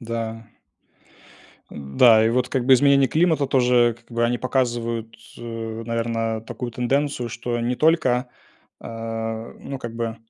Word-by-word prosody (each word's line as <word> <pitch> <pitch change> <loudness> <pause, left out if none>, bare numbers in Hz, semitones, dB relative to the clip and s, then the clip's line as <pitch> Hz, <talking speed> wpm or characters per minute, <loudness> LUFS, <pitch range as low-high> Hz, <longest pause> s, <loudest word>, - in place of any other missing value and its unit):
Да. 115 -1 -5 1.2
М 70 -1 -9
да, 110 -3 +7
и - - +3
вот, 125 +1 0
как 130 -3 -1
бы 135 - +6
изменения 140 0 +4
климата, 160 -1 +2
тоже, 125 -3 +3
как 120 - -29
бы, 120 0 0
они 120 +1 0
показывают, 120 -3 -2 0.2
э, 115 -1 -6
наверное, 115 -1 -2
такую 120 +2 -7
тенденцию, 125 +1 -1
что 120 +1 -4
не 125 +2 -1
только, 130 -6 +2 0.5
а, 115 0 -5
ну 135 - -6
как 120 -2 -7
бы, 115 -1 -3
120 Hz, 145 wpm, -22 LUFS, 115-125 Hz, 1.2 s, да